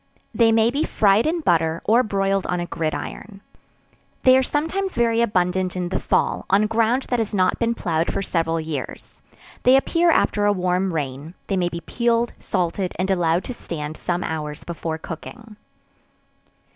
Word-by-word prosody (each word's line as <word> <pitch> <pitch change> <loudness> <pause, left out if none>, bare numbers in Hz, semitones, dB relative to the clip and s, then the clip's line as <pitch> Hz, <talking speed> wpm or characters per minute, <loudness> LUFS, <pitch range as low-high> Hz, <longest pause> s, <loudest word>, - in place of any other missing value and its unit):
They 230 -1 +4
may 225 +1 +3
be 285 +4 0
fried 205 +4 +3
in 335 +1 0
butter, 165 - +1
or 230 +3 +5
broiled 195 -3 0
on 180 - -1
a 175 - -2
gridiron. 175 +5 -5 0.8
They 255 0 +7
are 260 - +5
sometimes 325 +8 -2
very 230 -1 +2
abundant 185 -4 0
in 180 -1 -2
the 190 - -1
fall, - - 0
on 200 +2 +4
ground 230 +4 +1
that 245 - +2
has 215 -2 -2
not 185 -1 +2
been 235 0 +1
ploughed 165 -5 -1
for - - -2
several 165 -2 0
years; 155 -5 -6 0.4
they 255 +1 +5
appear 335 +5 +2
after 205 -9 +2
a 205 - +4
warm 185 0 0
rain; 150 +1 -4
they 195 - -1
may 180 -2 +1
be 170 0 -6
peeled, 235 +5 0
salted, 180 +1 -2
and 190 +2 0
allowed 175 -1 +1
to 250 - -6
stand 155 -8 -6
some 175 +2 -2
hours 150 -2 -4
before 165 -1 -4
cooking. 225 +6 -9
195 Hz, 170 wpm, -22 LUFS, 170-230 Hz, 0.8 s, They